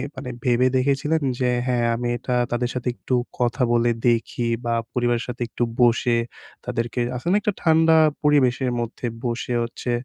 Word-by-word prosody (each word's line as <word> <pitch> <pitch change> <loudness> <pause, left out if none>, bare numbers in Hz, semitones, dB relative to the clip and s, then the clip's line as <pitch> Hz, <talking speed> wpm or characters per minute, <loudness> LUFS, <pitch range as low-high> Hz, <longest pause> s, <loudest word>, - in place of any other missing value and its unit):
মানে 130 -1 -6 0.2
ভেবে 125 0 +3
দেখেছিলেন 145 +4 +1 0.2
যে 125 -1 +1 0.2
হ্যাঁ। 120 -2 +1
আমি 120 +1 -3
এটা 125 +1 -2 0.2
তাদের 120 0 0
সাথে 125 0 -3
একটু 130 - -2 0.2
কথা 120 +1 0
বলে 120 0 +3 0.2
দেখি 115 +1 -1 0.2
বা 115 - 0 0.2
পরিবারের 120 -1 0
সাথে 125 0 -7
একটু 120 - -2 0.2
বসে 120 0 +3 0.5
তাদেরকে 115 +1 -3 0.2
আছে 125 +7 -6
না - - +4
একটা 210 -1 0
ঠান্ডা 160 0 +5 0.3
পরিবেশের 130 -3 +3
মধ্যে 120 +1 -4 0.2
বসে 120 +1 -2
হচ্ছে 120 +1 -4
125 Hz, 160 wpm, -23 LUFS, 120-130 Hz, 0.5 s, ঠান্ডা